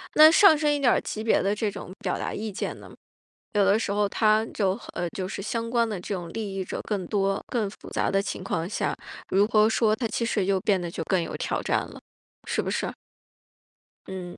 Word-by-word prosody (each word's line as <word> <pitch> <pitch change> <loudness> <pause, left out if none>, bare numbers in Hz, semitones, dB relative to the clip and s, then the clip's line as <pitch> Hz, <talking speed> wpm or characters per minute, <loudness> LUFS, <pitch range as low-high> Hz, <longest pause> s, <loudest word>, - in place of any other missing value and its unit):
那 310 +1 +9
上 360 -2 +7
升 295 0 +2
一 290 - 0
点 260 -3 +4
儿 - - +1
级 215 - -5
别 225 - +3
的 200 +2 +1
这 215 0 -1
种 185 - -8
表 - - -2
达 - - -3
意 215 0 -4
见 200 - -4
呢？ - - -13 0.6
有 205 -2 +3
的 200 +2 +4
时 210 - -2
候 205 0 +2
它 215 +1 +3
就， 195 -2 0
呃， 175 - -2
就 185 -1 -3
是 195 - -5
相 230 +3 -3
关 235 -1 +2
的 205 -4 -4
这 190 - -5
种 175 -2 -6
利 210 -3 -4
益 190 - -2
者 - - -5
更 200 -4 -2
多、 195 0 0
更 225 -5 -1
复 200 - -12
杂 - - 0
的 195 - +2
情 190 - -5
况 165 -3 -2
下， - - -1 0.3
如 200 +2 +3
何 215 -1 +4
说， 220 -1 +2
它 230 +1 -2
其 230 +1 -2
实 210 -4 0
就 195 0 +2
变 195 -3 +2
得 175 - -4 0.2
更 185 -1 +1
有 165 - -5
挑 - - -2
战 - - +1
了， - - -8 0.5
是 - - 0
不 - - -4
是？ - - -1 1.2
嗯。 180 -2 -7
205 Hz, 250 characters per minute, -26 LUFS, 190-225 Hz, 1.2 s, 那